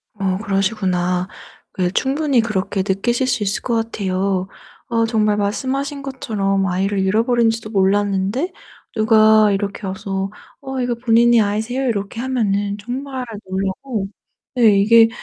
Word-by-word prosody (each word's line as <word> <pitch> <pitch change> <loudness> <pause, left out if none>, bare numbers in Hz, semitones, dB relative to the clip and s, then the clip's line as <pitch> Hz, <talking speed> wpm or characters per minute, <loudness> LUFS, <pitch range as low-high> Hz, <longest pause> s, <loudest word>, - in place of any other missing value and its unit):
어 190 -2 -1
그러시구나. 190 -3 0 0.4
그게 180 -3 -1
충분히 275 +2 +1
그렇게 195 -3 -1
느끼실 240 +7 0
수 230 -4 0
있을 200 +1 -1
것 235 - -1
같아요. 195 -4 -1 0.4
어 230 -1 +1
정말 215 -2 +1
말씀하신 270 +7 -2
것처럼 205 -8 -1
아이를 195 +2 0
잃어버린지도 225 +2 +1
몰랐는데 200 - +1 0.4
누가 215 -1 +5
이렇게 200 0 -3
와서 195 +1 -3 0.3
"어 265 -1 -4
이거 245 -1 -1
본인의 235 0 +4
아이세요?" 220 +6 -1
이렇게 205 0 -2
하면은 205 -6 -1
정말 260 +3 -5 0.2
놀라고 195 +3 -3 0.5
네 215 -5 +5
이게 225 +2 +6
215 Hz, 305 characters per minute, -19 LUFS, 195-240 Hz, 0.5 s, 이게